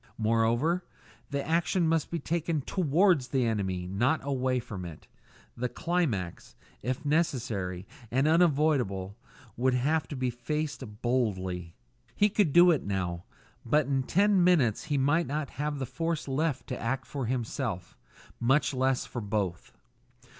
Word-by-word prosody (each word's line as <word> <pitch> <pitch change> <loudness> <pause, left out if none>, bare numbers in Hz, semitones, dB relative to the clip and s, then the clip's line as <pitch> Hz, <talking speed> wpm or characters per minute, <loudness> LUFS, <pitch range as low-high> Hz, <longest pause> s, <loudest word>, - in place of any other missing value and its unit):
Moreover, 115 +10 +2 0.5
the 140 -1 -3
action 170 +1 +2
must 165 -2 +1
be 170 - -2
taken 165 0 -1
towards 170 -2 +2
the 130 -1 +1
enemy, 95 -5 -1
not 120 - +1
away 130 -2 0
from 105 -6 -7
it; 85 -3 -9 0.5
the 125 +1 -2
climax, 150 - -2 0.3
if 130 +6 -3
necessary 115 - -1 0.2
and 135 +6 +2
unavoidable, 145 - +2 0.4
would 130 +1 +2
have 150 +6 +1
to 145 - -6
be 130 -1 -1
faced 145 +5 -3 0.2
boldly. 95 -8 -1 0.4
He 210 - +4
could 200 -6 +2
do 175 +3 +7
it 155 - +1
now; 90 -3 -3 0.4
but 150 +5 +2
in 135 0 +1
ten 195 +6 +3
minutes 150 - +3
he 150 -3 0
might 145 +5 +2
not 145 0 -3
have 150 0 -1
the 135 - -2
force 165 +5 -3
left 140 +1 -1
to 125 - -4
act 130 +3 -2
for 135 -5 -4
himself, 115 -6 -3 0.4
much 135 +5 +2
less 130 0 +1
for 120 - -5
both! 100 -4 -2
130 Hz, 145 wpm, -29 LUFS, 115-155 Hz, 0.5 s, do